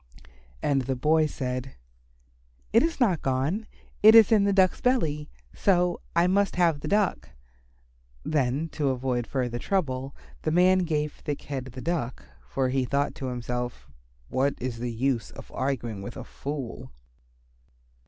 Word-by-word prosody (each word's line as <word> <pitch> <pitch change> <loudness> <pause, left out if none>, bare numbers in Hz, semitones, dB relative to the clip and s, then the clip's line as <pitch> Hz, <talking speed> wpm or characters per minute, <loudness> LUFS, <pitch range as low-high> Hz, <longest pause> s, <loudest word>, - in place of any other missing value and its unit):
And 140 -2 +2
the 130 +1 -2
boy 155 +4 +3
said, 130 -2 -4 1.0
"It 230 - +6
is 330 +1 -1
not 195 - +2
gone. 140 +12 -1 0.3
It 220 +2 +9
is 225 0 +8
in 210 -3 +5
the 200 - +3
Duck's 190 -2 +3
belly. 155 - +1 0.2
So 180 -3 +2
I 170 +1 +4
must 195 +2 +2
have 170 -4 +3
the - - -6
Duck." 205 -1 +1 1.0
Then 145 +1 0
to 145 -3 -1
avoid 125 -2 -1
further 125 -3 -2
trouble 135 -6 -1 0.3
the - - -1
man 180 +3 +5
gave 150 -4 -1
Thick 145 -1 -5
head 135 -3 -4
the 130 0 -9
Duck, 150 -7 -3 0.2
for 130 - 0
he 130 0 +1
thought 140 +3 0
to 130 - -2
himself, 125 - -4 0.4
"What 135 - +1
is 120 -2 -4
the 120 0 -3
use 120 +1 -1
of - - -12
arguing 120 -6 -2
with 100 - -7
a - - -6
fool." 140 -4 -6
140 Hz, 155 wpm, -27 LUFS, 130-175 Hz, 1.0 s, It